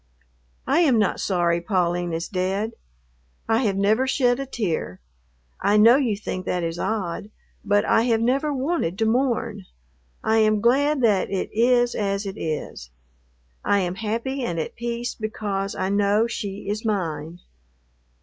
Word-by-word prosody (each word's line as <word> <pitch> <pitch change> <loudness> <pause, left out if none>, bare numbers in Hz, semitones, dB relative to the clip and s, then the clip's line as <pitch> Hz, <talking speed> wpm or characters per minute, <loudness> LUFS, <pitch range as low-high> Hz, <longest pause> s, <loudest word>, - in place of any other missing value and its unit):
"I 330 - +2
am 285 -9 +4
not 210 -2 +1
sorry 175 -3 +1
Pauline 175 -2 0
is 165 +1 -3
dead. 195 +3 -1 0.8
I 225 0 +3
have 195 -2 0
never 215 +6 +2
shed 250 -2 +2
a 275 - -4
tear. 170 - -3 0.6
I 205 +1 +3
know 230 +4 +7
you 240 -8 0
think 185 -3 -5
that 180 -1 -1
is 165 +1 -3
odd, 205 -2 -3 0.3
but 205 0 +2
I - - +4
have 230 -2 +2
never 270 +6 +1
wanted 270 - -1
to 225 - +1
mourn. 230 -4 0 0.6
I 220 0 +2
am 215 -1 +3
glad 275 +6 +2
that 210 -5 +2
it 195 -1 -2
is 245 +2 +3
as 200 0 -1
it 195 0 -5
is. 155 - -4 0.7
I 200 -1 +2
am 180 -1 -1
happy 230 +7 -3
and 175 -9 -2
at 160 - -4
peace 235 +1 -3
because 205 -3 -3
I 190 0 -1
know 205 +2 +2
she 200 -4 -5
is 210 +2 -2
mine. 170 -7 -2
210 Hz, 160 wpm, -23 LUFS, 190-235 Hz, 0.8 s, know